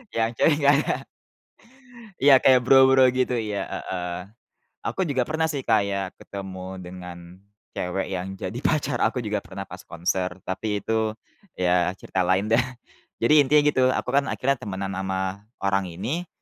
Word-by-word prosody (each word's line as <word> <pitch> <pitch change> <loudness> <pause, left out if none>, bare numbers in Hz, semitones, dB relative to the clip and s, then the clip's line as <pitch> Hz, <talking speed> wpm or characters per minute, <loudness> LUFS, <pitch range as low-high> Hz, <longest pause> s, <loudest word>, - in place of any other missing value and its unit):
yang 115 0 +1
cewek 145 +6 +3
nggak 145 -1 +4
ada. - - +2 1.3
Iya, 140 -1 +8
kayak 130 -1 +5
Bro 130 +1 +7
Bro, 130 -1 +6
gitu, 130 0 0
iya, 105 -3 -2
heeh. 90 -1 -4 0.7
Aku - - -3
juga 130 -3 +1
pernah 160 +4 -1
sih 140 -4 -3
kayak 100 -4 +1
ketemu 95 -1 -7
dengan 90 -1 -9 0.5
cewek 95 +2 -3
yang 95 +1 -4
jadi 95 +5 -5
pacar 145 -6 0
aku 125 - 0
juga 105 -1 -1
pernah 95 0 -8
pas 90 0 -10
konser, 90 +1 -2 0.2
tapi 100 +2 -3
itu 110 -1 0 0.4
ya 90 -1 +2
cerita 95 - -3
lain 95 +4 +1
deh. 115 - +6 0.6
Jadi, 115 +6 +2
intinya 145 +2 +4
gitu, 145 -3 +3
aku 130 0 -1
kan 140 -1 +2
akhirnya 135 0 0
temenan 95 -1 -4
sama 95 0 -3 0.2
orang 100 -1 0
ini, 120 - -4
105 Hz, 155 wpm, -24 LUFS, 95-130 Hz, 1.3 s, Iya